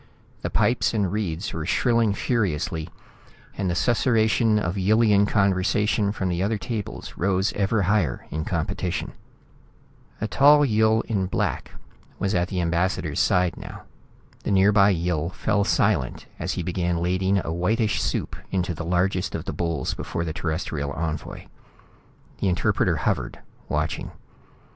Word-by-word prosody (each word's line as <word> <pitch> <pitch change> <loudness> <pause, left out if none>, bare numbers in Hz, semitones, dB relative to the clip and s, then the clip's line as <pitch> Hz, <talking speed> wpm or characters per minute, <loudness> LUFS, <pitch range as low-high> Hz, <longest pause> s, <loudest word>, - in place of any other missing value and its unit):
The - - -2
pipes 120 -1 +1
and 100 -4 +1
reeds 95 -3 -3
were 80 - -3
shrilling 115 +3 +2
furiously, 85 - -1 0.7
and 95 -2 -1
the 85 - -1
susurration 115 -1 +2
of 90 -4 -1
Yillian 105 +1 +3
conversation 100 +1 +1
from 100 -2 -2
the 90 0 -1
other 105 +3 0
tables 105 0 -5
rose 95 +1 +1
ever 100 +1 +1
higher 90 - 0
in 80 +1 -2
competition. 80 -2 -2 1.1
A 110 - -1
tall 145 +9 +6
Yill 110 -2 +3
in 100 -4 -1
black - - -2 0.5
was 100 +1 -1
at 90 -1 +1
the 90 -2 -2
ambassador's 85 -1 0
side 90 0 +2
now. - - -9 0.6
The - - -3
nearby 100 +1 +5
Yill 85 -3 0
fell 105 +2 0
silent 65 -9 +1
as - - -2
he 90 - -3
began 90 0 -1
ladling 95 +3 +1
a 80 - -2
whitish 105 +5 0
soup - - -2
into 90 -2 -1
the 85 - -6
largest 90 +2 0
of - - -5
the - - -4
bowls 85 -6 -2
before 85 - -4
the 80 - -3
Terrestrial 80 -3 -3
envoy. 80 -2 -4 0.9
The - - 0
interpreter 90 - +1
hovered, - - -1 0.3
watching. - - -2
95 Hz, 145 wpm, -24 LUFS, 85-105 Hz, 1.1 s, tall